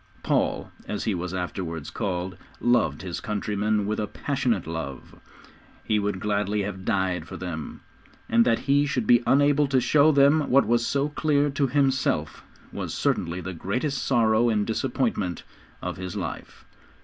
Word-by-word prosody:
Paul, - - 0 0.2
as 105 - -3
he 110 - 0
was 90 0 -3
afterwards 90 -4 -4
called, 95 -1 -3 0.2
loved 110 - +2
his 90 -2 -4
countrymen 105 0 -1
with 110 +2 -2
a 105 - -1
passionate 125 - -1
love. 80 -5 -6 0.7
He 105 - +1
would 100 -2 -2
gladly 105 0 0
have 95 -2 -5
died 95 -4 0
for - - -7
them, 85 -5 -6 0.5
and 115 +1 +4
that 115 -1 +3
he 145 +1 +2
should 125 -5 -1
be 120 +2 +5
unable 145 +1 +4
to 135 -1 +2
show 145 +5 +4
them 140 +1 +4
what 140 +2 +5
was 120 0 +2
so 140 +1 0
clear 145 -1 +1
to 140 0 +1
himself, 130 - 0 0.3
was - - -4
certainly 85 +2 -1
the 95 +2 -5
greatest 125 - -2
sorrow 115 -2 +3
and 105 -2 +1
disappointment 115 -6 -1 0.4
of - - -4
his 95 +1 -6
life. 90 -6 -6
105 Hz, 160 wpm, -25 LUFS, 95-135 Hz, 0.7 s, be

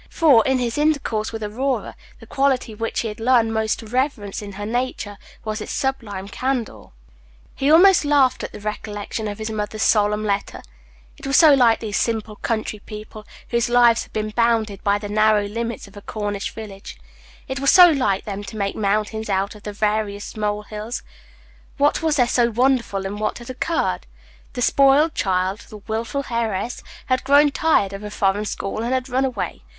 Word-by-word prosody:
For, 275 -9 +5
in 265 0 +2
his 245 +1 -2
intercourse 280 -8 0
with 225 -1 -5
Aurora, 255 +6 -2 0.2
the - - -13
quality 265 -4 0
which 225 +2 -2
he 230 - -3
had 210 0 -7
learned 230 -1 +3
most 220 -1 0
to - - -10
reverence 240 -4 -2
in 200 -1 -8
her 205 +1 -6
nature 220 -3 -3 0.3
was 215 0 -3
its - - -6
sublime 220 -8 -3
candor. 255 +1 -3 0.7
He 275 - 0
almost 355 +4 +7
laughed 285 -3 +3
at - - -5
the - - -9
recollection 210 +1 -4
of 205 -1 -5
his 220 0 -4
mother's 215 0 -3
solemn 210 0 +2
letter. 200 -1 -2 0.6
It - - -7
was 275 - +3
so 315 -3 +8
like 240 -4 +4
these 210 -3 -2
simple 220 -2 -2
country 215 -2 -3
people, 215 0 -10 0.2
whose 235 0 +1
lives 240 -1 +5
had - - -10
been 215 0 -3
bounded 225 -3 0
by 200 0 +2
the 205 0 -6
narrow 215 0 +3
limits 230 +1 -4
of 200 - -17
a 205 - -9
Cornish 205 -1 -4
village 200 - -9 0.5
it 265 +1 -4
was 275 0 +2
so 360 -1 +9
like 260 - +1
them 205 -1 -5
to 200 +2 -8
make 200 -1 -2
mountains 215 +1 -1
out 195 0 0
of 210 - -14
the 210 - -6
veriest 210 -1 -2
mole 210 -1 -2
hills. 215 +3 -6 0.7
What 290 +1 +2
was 320 -2 +1
there 245 -4 +3
so 240 -1 +2
wonderful 235 -5 +1
in 200 +2 -4
that - - -7
which - - -1
had 240 0 -11
occurred? 320 +6 -1 0.5
The 245 -2 -2
spoiled 280 +5 +4
child, 190 +1 0
the 215 - -9
wilful 225 +6 -4
heiress, 230 0 -2 0.2
had 255 -1 0
grown 285 +2 +5
tired 275 - +2
of 195 - -6
a 210 - -5
foreign 205 0 0
school, 200 +1 -4
and 240 +3 0
had 255 0 -2
run 260 +1 +1
away. 250 -6 -4
220 Hz, 190 wpm, -21 LUFS, 210-255 Hz, 0.7 s, so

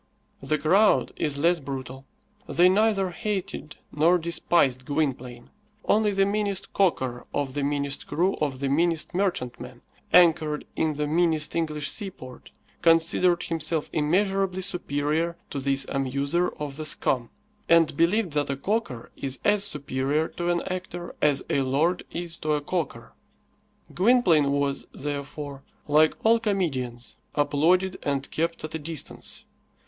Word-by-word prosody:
The 155 +3 0
crowd 190 +8 +3
is 145 -2 -2
less 170 +4 +3
brutal. 135 -1 -7 0.4
They 180 +1 +4
neither 195 -1 +2
hated 190 -5 -4 0.2
nor 165 +4 +3
despised 165 -6 +1
Gwynplaine. 130 -4 -3 0.3
Only 215 0 +3
the 195 -1 +2
meanest 200 -1 -2
calker 130 -11 0
of 140 -2 -1
the 145 - -2
meanest 140 0 -2
crew 180 +4 +1
of 140 -4 -2
the 140 - 0
meanest 165 +4 +1
merchantman, 125 -10 -3 0.3
anchored 160 -4 +4
in 155 -1 0
the 150 +1 -2
meanest 160 0 +1
English 155 -3 -1
seaport, 180 - -4 0.3
considered 170 +1 +3
himself 160 -1 -1
immeasurably 190 +4 +1
superior 165 -2 -1
to 140 - -3
this 135 0 +1
amuser 140 +6 -1
of 145 -2 -4
the 155 - -5
"scum," 125 -5 0 0.4
and 165 -3 +4
believed 175 +2 +2
that 145 -1 0
a 140 - -2
calker 190 - -3
is 135 -1 -2
as 205 -1 +4
superior 145 -3 -1
to 175 0 -3
an 175 -1 0
actor 180 -1 -5
as 145 -2 +3
a 140 - +1
lord 150 +7 +1
is 170 -1 -5
to 155 0 -1
a 150 - 0
calker. 145 -8 -4 0.8
Gwynplaine 185 - +4
was, 140 -1 -1
therefore, 145 0 -6 0.3
like 155 +1 +4
all 230 +1 +5
comedians, 135 - -2 0.2
applauded 175 +6 +2
and 140 -1 -2
kept 165 +1 -2
at 155 - -6
a 160 - -3
distance. 155 -1 -5
155 Hz, 140 wpm, -25 LUFS, 140-180 Hz, 0.8 s, all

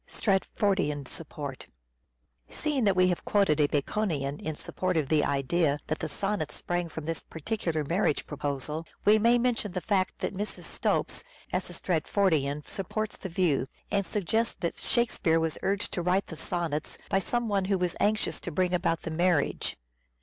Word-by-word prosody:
Stratfordian 190 - +1 1.4
Seeing 285 -6 0
that 195 -2 +4
we 185 0 +5
have 175 - -1
quoted 195 -7 +3
a 145 - +5
Baconian 145 -2 -1
in 155 -1 -3
support 185 +3 -1
of 145 -4 0
the 155 -2 +4
idea 145 +2 +2
that 155 - -2
the 160 - -3
sonnets 195 -3 -1
sprang 175 -1 -2
from 160 -1 -6
this 165 0 -2
particular 165 -2 -2
marriage 165 +1 +1
proposal, 145 +1 -3 0.2
we 215 +1 +7
may 235 +3 +5
mention 235 -5 0
the 185 - 0
fact 190 -1 +1
that - - -2
Mrs. 205 +2 -4
Stopes, - - -1 0.3
as - - 0
a - - -7
Stratfordian, 155 -4 +1
supports 210 +3 -3
the 190 - -6
view, 165 -7 +2 0.2
and 200 -1 +1
suggests 220 +3 0
that 170 - -2
Shakspere 205 -8 +2
was 160 -1 -1
urged 195 0 0
to 175 - 0
write 180 +3 +2
the 165 - -8
sonnets 160 -2 -2
by 195 - +2
some 240 +5 -1
one 200 -3 +1
who 195 0 +2
was 180 -1 0
anxious 215 +1 +1
to 175 - -5
bring 180 +3 +1
about 170 -2 +1
the 165 - -3
marriage. 170 -2 +1
180 Hz, 170 wpm, -29 LUFS, 155-200 Hz, 1.4 s, we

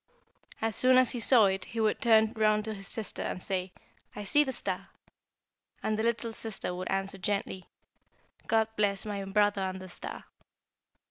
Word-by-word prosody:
As 225 -1 0
soon 255 0 +5
as 255 -1 +5
he 245 - -4
saw 230 -1 +6
it 190 -1 0
he 230 - -6
would 215 -1 +1
turn 220 -1 +4
round 215 -2 +2
to 220 - -3
his 195 -1 -8
sister, 220 -3 -1
and - - -3
say, 185 -1 -2 0.4
'I 210 - -5
see 290 +9 +4
the 265 - -3
star,' 255 - -4 1.0
and 215 - 0
the 215 - -1
little 230 0 -1
sister 220 -5 -3
would 180 +1 -5
answer 195 0 -1
gently, 195 -1 -2 0.8
'God 220 -1 +3
bless 200 -1 +1
my 205 -2 -4
brother 205 0 +2
and 190 0 -3
the 185 0 -10
star!' - - -8
210 Hz, 180 wpm, -29 LUFS, 195-225 Hz, 1.0 s, saw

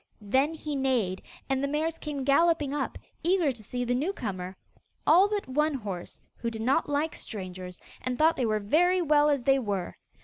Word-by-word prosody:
Then 265 +9 +1
he 300 -2 -4
neighed, 245 -9 0 0.3
and 270 0 0
the - - +1
mares 315 +3 -1
came 290 -3 -4
galloping 290 +1 +3
up, 290 -2 -2 0.2
eager 345 -3 +2
to 240 -4 -9
see 245 +4 -3
the 245 - 0
new 300 +10 0
comer 185 - -5 0.5
all 365 +6 +6
but 415 -1 -2
one 300 +3 +1
horse, 200 -8 -6 0.2
who 235 - -2
did 225 -1 -5
not 270 +6 +2
like 295 +2 0
strangers, 185 -3 -7 0.2
and 250 -1 -2
thought 320 +3 +4
they 250 - 0
were 215 -1 +1
very 350 - +3
well 300 -1 +4
as 280 -4 +1
they 270 0 +4
were. 200 -7 -3
270 Hz, 195 wpm, -28 LUFS, 220-305 Hz, 0.5 s, all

